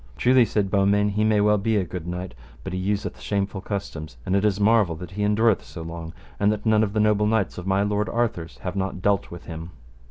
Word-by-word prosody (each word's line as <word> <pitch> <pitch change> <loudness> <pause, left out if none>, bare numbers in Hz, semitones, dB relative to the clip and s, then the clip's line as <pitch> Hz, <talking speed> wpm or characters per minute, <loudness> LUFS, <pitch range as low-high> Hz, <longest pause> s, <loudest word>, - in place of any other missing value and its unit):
Truly, 125 -1 +5
said 100 -3 -1
Beaumains, 100 +1 +3
he 105 +1 +1
may 110 -1 +3
well 105 0 +4
be 110 +2 0
a 100 - +2
good 90 -1 -6
knight, 90 -1 -5 0.3
but 95 - -5
he 90 - -2
useth 100 +3 -2
shameful 100 -1 -2
customs, 80 - -5
and 95 - 0
it 100 - +2
is 105 -1 +2
marvel 105 -5 +3
that 90 +3 -9
he 100 +2 -5
endureth 105 +1 +3
so 80 - -9
long 80 0 -7 0.3
that 105 +1 +1
none 110 -1 +4
of 100 -2 -2
the 110 - +1
noble 105 0 +3
knights 105 -5 0
of 90 - -7
my 95 +1 +2
lord 105 -1 0
Arthur's 110 -9 -2
have 90 0 -3
not 95 -1 -3
dealt 100 -1 +1
with 85 - -10
him. 80 0 -7
100 Hz, 230 wpm, -24 LUFS, 90-105 Hz, 0.3 s, Truly